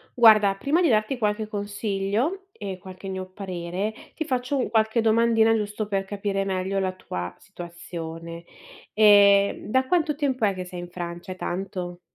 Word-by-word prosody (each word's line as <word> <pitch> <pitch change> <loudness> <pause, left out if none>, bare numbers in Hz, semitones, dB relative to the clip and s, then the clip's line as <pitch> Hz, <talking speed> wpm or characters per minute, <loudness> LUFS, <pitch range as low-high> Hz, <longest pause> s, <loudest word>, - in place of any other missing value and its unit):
Guarda, 215 -4 +7
prima 290 - +1
di 335 - +4
darti 215 +2 +2
qualche 215 -1 0
consiglio 205 - -2
e 195 - -6
qualche 185 +1 -10
mio 190 -1 -4
parere, 185 +1 -4 0.2
ti 315 - -2
faccio 255 -1 -1
un 255 - 0
qualche 220 +1 +2
domandina 225 0 +4
giusto 210 0 -2
per 195 -1 -1
capire 195 0 -2
meglio 190 0 -1
la 185 -1 -1
tua 90 - -6
situazione. 170 - -8 0.5
Ehm, 200 -1 +5
da 260 +4 +2
quanto 310 -1 +1
tempo 265 -5 0
è 200 -2 +2
che 185 -1 -5
sei 180 0 -7
in 175 - -7
Francia, 175 +1 -6
è - - -8
tanto? 180 -1 -4
200 Hz, 165 wpm, -25 LUFS, 185-225 Hz, 0.5 s, Guarda